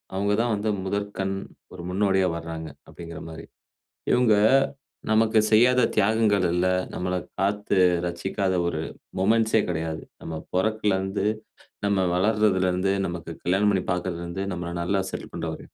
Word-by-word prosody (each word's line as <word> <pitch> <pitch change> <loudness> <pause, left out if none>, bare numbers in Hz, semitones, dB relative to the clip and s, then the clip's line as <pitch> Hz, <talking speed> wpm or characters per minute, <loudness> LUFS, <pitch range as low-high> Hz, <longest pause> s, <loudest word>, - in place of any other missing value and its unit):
அவுங்கதான் 105 +4 +1
வந்து 105 +1 -2
முதற்கண், 95 0 -2 0.4
ஒரு 90 - -8
முன்னோடியா 95 -1 +2
வர்றாங்க, 80 -1 -6 0.2
அப்பிடிங்கிறமாரி. 80 -1 -9 0.7
இவுங்க 125 -3 +4 0.8
நமக்கு 110 0 +4
செய்யாத 125 +3 +5
தியாகங்கள் 105 -2 +3
இல்ல. 90 +1 +2 0.3
நம்மள 90 0 -2 0.2
காத்து 100 +1 0 0.3
ரட்சிக்காத 95 +3 -1
ஒரு 85 -2 -2 0.4
மொமென்ட்ஸ்ஸே 110 +2 +3
கிடையாது. 80 -2 -3 0.2
நம்ம 80 -1 -5
பிறந்ததிலிருந்து, 100 0 0 0.6
நம்ம 100 -1 +2 0.2
வளர்றதில 100 -1 +2
இருந்து, 90 +2 0
நமக்கு 85 -2 -5
கல்யாணம் 95 +3 +2
பண்ணி 95 -2 +1
பார்க்கிறதில 90 -1 -2
இருந்து, 90 +3 -4
நம்மள 85 -1 -4
நல்லா 95 +3 +1
செட்டில் - - -7
பண்ற 85 -1 -4
வரையும், - - -12
95 Hz, 125 wpm, -25 LUFS, 90-105 Hz, 0.8 s, செய்யாத